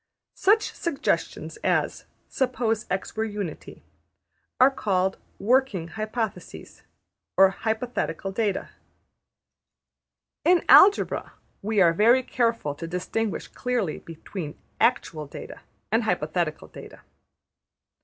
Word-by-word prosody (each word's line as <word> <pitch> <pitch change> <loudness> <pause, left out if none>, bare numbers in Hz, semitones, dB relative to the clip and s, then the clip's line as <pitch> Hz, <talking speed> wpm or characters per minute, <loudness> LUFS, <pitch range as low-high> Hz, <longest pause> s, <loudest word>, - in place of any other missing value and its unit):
Such 425 +2 +2
suggestions 335 -5 -2
as - - 0 0.2
``suppose 235 -4 -1
$x$ 190 +1 -3
were 220 - 0
Unity'' 205 -6 -6 0.8
are 260 +2 +7
called 190 -6 0 0.2
``working 215 -6 +1
hypotheses,'' 215 -4 -5 0.6
or 190 0 +7
``hypothetical 220 -2 -3
data.'' 205 -2 -1 1.7
In 355 0 +4
Algebra 405 +2 +6 0.3
we 215 +1 0
are 170 -2 +5
very 235 +8 +4
careful 230 - 0
to 165 +3 -7
distinguish 185 +5 -3
clearly 245 -10 -2
between 165 -1 -8 0.2
actual 155 -2 +1
data - - -9 0.3
and - - +3
hypothetical - - -1
data. - - -12
215 Hz, 95 wpm, -25 LUFS, 185-250 Hz, 1.7 s, are